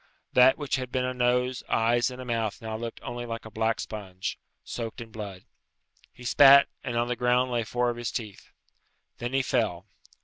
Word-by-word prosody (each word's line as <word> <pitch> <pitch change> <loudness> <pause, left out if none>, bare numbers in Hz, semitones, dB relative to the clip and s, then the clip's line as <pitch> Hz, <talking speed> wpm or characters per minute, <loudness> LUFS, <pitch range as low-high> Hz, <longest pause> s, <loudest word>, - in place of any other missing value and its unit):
That 125 +1 +6
which 145 -3 -1
had 130 -1 -5
been 130 -1 0
a 130 - -2
nose, 125 0 +1
eyes, 120 +2 +2
and 125 0 -9
a 130 - -6
mouth 115 -3 -2
now 110 -1 -5
looked 115 +1 -5
only 120 0 -5
like 115 -1 -5
a 110 - -9
black 110 +1 0
sponge, 95 -4 -5 0.2
soaked 115 0 -5
in 115 -1 -9
blood. 100 -4 -8 0.7
He 125 - -15
spat, 140 +2 +7 0.2
and 120 -3 -3
on 120 0 +1
the 125 - -1
ground 125 +1 +2
lay 120 -1 0
four 120 +2 0
of 120 - -7
his 120 -2 -3
teeth. 110 -5 -6 0.7
Then 120 +2 -4
he 135 0 +2
fell. 110 -9 0
120 Hz, 200 wpm, -27 LUFS, 110-125 Hz, 0.7 s, spat